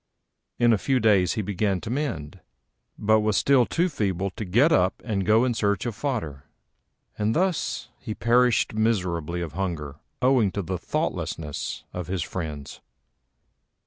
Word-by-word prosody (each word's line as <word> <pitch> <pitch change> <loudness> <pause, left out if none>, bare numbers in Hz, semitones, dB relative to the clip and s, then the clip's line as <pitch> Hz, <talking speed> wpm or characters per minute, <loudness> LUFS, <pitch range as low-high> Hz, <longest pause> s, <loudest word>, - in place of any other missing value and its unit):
In 120 -1 +4
a 105 - +1
few 135 +3 +1
days 100 -6 +3
he 110 - -2
began 100 0 0
to 110 - -5
mend, 120 - -3 0.6
but 110 +1 +3
was 105 -1 +1
still 135 -4 +4
too 175 +2 +1
feeble 100 - -1
to 110 +2 -6
get 120 - +4
up 95 - +2
and 100 -5 -1
go 110 +3 +5
in 125 - +1
search 100 -2 0
of 120 - -2
fodder; 105 - -4 0.7
and 105 +1 +1
thus 180 -1 -1
he 110 - -5
perished 120 0 +3
miserably 90 -7 0
of 80 -4 -5
hunger 80 -6 -3 0.2
owing 125 -6 +3
to 100 - -2
the 90 +1 -3
thoughtlessness 75 -3 -3
of 90 -2 -5
his 90 -3 -2
friends. 80 -5 -6
105 Hz, 155 wpm, -25 LUFS, 90-120 Hz, 0.7 s, go